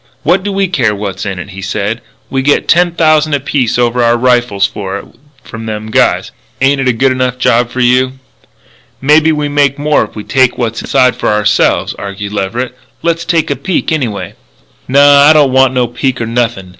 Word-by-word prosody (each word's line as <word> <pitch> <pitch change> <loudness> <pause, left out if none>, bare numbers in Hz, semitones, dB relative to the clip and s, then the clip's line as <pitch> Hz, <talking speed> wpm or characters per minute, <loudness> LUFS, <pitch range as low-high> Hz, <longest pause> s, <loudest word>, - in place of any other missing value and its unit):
"What 185 +1 +2
do 205 +1 -3
we 195 0 0
care 125 - 0
what's 100 0 -5
in 95 -2 -4
it?" 90 +3 -8
he 95 +1 -9
said. 105 +3 -3 0.3
"We 135 - 0
get 145 +2 +1
ten 175 0 +3
thousand 155 -2 +2
apiece 135 -4 -1
over 120 0 +1
our 120 0 +3
rifles 120 -5 +1
for 100 -1 -5
it - - -9 0.4
from 115 0 -9
them 110 0 -5
guys. - - +1 0.3
Ain't 135 +1 +2
it 135 - -1
a - - +4
good 130 +3 +1
enough 130 -1 -1
job 120 -1 +1
for 125 +1 -3
you?" 130 +1 +2 0.9
"Maybe 155 +3 +3
we 150 -1 -1
make 145 -1 +1
more 150 -2 +1
if 105 - -10
we 105 - -6
take 130 0 +1
what's 115 -2 -2
inside 130 -2 +2
it - - -18
for - - 0
ourselves," 105 -1 +1
argued 100 +1 -6
Leverett. 115 +6 -3 0.3
"Let's 170 0 -1
take 165 -4 0
a - - 0
peek, 185 +1 -2
anyway." 125 -10 -3 0.5
"Naw. 140 +2 +6
I - - +7
don't 145 -4 +3
want 130 0 +3
no 125 -1 +2
peek 125 +2 -2
nor 115 - -2
nothin'. 115 -5 -2
125 Hz, 205 wpm, -12 LUFS, 110-145 Hz, 0.9 s, I